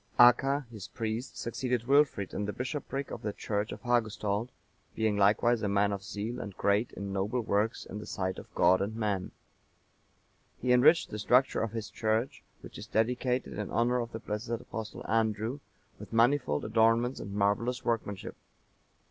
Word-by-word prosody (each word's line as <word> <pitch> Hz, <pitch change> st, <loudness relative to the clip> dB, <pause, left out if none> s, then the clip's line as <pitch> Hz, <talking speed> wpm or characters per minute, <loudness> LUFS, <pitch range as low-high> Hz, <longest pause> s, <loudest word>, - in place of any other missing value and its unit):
Acca,(942) 135 Hz, +3 st, +5 dB
his 110 Hz, -5 st, -8 dB
priest, 115 Hz, +3 st, -4 dB
succeeded 125 Hz, 0 st, -2 dB
Wilfrid 140 Hz, -8 st, +3 dB
in 105 Hz, -, -2 dB
the 105 Hz, -, -3 dB
bishopric 135 Hz, +1 st, -4 dB
of -, -, -6 dB
the 105 Hz, -, -2 dB
church 105 Hz, +1 st, -3 dB
of -, -, -8 dB
Hagustald, 110 Hz, -2 st, 0 dB, 0.5 s
being 110 Hz, -2 st, +1 dB
likewise 105 Hz, +4 st, +3 dB
a 105 Hz, -, 0 dB
man 100 Hz, +1 st, +2 dB
of 100 Hz, -, -4 dB
zeal 105 Hz, +4 st, -4 dB
and 100 Hz, -2 st, -7 dB
great 105 Hz, +4 st, +1 dB
in 100 Hz, -1 st, -5 dB
noble 105 Hz, +6 st, 0 dB
works 110 Hz, +1 st, 0 dB
in 105 Hz, -, -7 dB
the -, -, -9 dB
sight 95 Hz, -2 st, -3 dB
of -, -, -13 dB
God 90 Hz, +2 st, +4 dB
and 105 Hz, +3 st, -2 dB
man. 105 Hz, -4 st, -1 dB, 1.3 s
He 125 Hz, 0 st, +2 dB
enriched 150 Hz, +7 st, +5 dB
the 105 Hz, -, -4 dB
structure 125 Hz, +5 st, +3 dB
of 115 Hz, -1 st, -2 dB
his 110 Hz, -2 st, -5 dB
church, 110 Hz, +3 st, -1 dB, 0.2 s
which -, -, -10 dB
is 105 Hz, -, -8 dB
dedicated 125 Hz, +2 st, 0 dB
in 105 Hz, -, -3 dB
honour 120 Hz, +1 st, +2 dB
of 120 Hz, -1 st, -4 dB
the -, -, -5 dB
blessed 105 Hz, +1 st, -5 dB
Apostle 110 Hz, -2 st, -5 dB
Andrew 110 Hz, +3 st, 0 dB, 0.4 s
with -, -, -10 dB
manifold 115 Hz, -, +2 dB
adornments 115 Hz, +3 st, +2 dB
and 100 Hz, -, -7 dB
marvellous 110 Hz, +5 st, 0 dB
workmanship. 105 Hz, -4 st, -2 dB
110 Hz, 170 wpm, -30 LUFS, 105-120 Hz, 1.3 s, Acca,(942